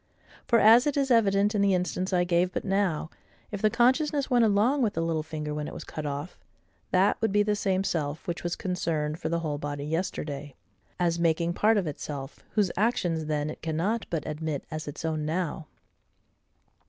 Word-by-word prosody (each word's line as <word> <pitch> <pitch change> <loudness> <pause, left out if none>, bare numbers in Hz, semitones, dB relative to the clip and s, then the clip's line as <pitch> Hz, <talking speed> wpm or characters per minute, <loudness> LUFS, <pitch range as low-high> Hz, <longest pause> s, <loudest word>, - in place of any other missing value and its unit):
For, 235 - +4
as 230 +5 +7
it 290 - 0
is 275 -2 +1
evident 205 -2 +4
in 205 - +1
the 200 -1 +4
instance 180 +1 -2
I 180 -1 +3
gave 175 +1 +2
but - - -4
now, 190 -5 0 0.4
if 205 -2 -4
the 215 - +4
consciousness 275 +5 +2
went 240 -2 +5
along 225 +7 +3
with 220 -4 +1
the 165 - 0
little 165 -1 0
finger 155 -1 -5
when 150 0 -3
it - - -8
was - - -6
cut 155 -1 -5
off, 145 +5 -5 0.5
that 190 +4 +2
would 225 -2 +1
be 205 +1 +4
the 210 0 +1
same 195 -2 0
self 155 -4 -2
which 175 - -3
was 175 0 -1
concerned 160 -4 -2
for 160 - -3
the 170 0 0
whole 150 -3 -3
body 145 -1 -4
yesterday, 150 -4 -3 0.4
as 170 -1 +1
making 170 0 +1
part 220 +4 +3
of 195 - +1
itself, 145 -2 -6
whose 205 -5 +2
actions 180 -7 0
then 150 0 -1
it - - -11
cannot 170 +8 -1
but 160 -4 -2
admit 155 -2 -3
as 155 -1 -5
its 145 +3 -6
own 155 -1 -1
now. 160 0 -2
175 Hz, 200 wpm, -27 LUFS, 155-205 Hz, 0.5 s, as